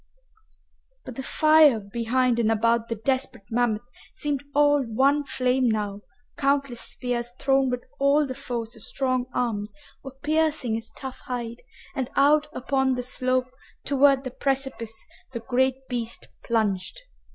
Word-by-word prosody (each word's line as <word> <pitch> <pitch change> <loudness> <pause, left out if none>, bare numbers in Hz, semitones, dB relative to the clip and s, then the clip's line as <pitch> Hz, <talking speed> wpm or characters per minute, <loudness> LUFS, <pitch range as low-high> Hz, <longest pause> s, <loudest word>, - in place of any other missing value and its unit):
But 255 - -8
the 265 - -4
fire 305 -3 +5
behind 235 +4 0
and 225 -1 +2
about 230 +1 +2
the 230 - -2
desperate 255 -1 -2
mammoth 230 -2 +1 0.3
seemed 290 -2 -2
all 290 0 +5
one 270 +5 +2
flame 255 -2 +1
now, 205 -2 -2 0.4
countless 275 -3 +1
spears 240 -1 -3
thrown 270 -1 +2
with 250 0 -3 0.2
all 280 +2 +4
the 260 - -4
force 240 -3 -4
of - - -13
strong 255 -2 -1
arms 210 -4 -2 0.3
were 270 - -7
piercing 305 -5 +2
his 225 0 -2
tough 265 -1 -8
hide, 235 -1 -5 0.3
and 265 -3 -3
out 295 +2 +4
upon 265 0 0
the 250 - -3
slope 255 0 0 0.3
toward 275 -1 +4
the 255 - -5
precipice 265 -5 -2 0.3
the 235 - -3
great 260 +2 0
beast 235 -2 -4
plunged. 220 - -1
255 Hz, 140 wpm, -25 LUFS, 230-275 Hz, 0.4 s, fire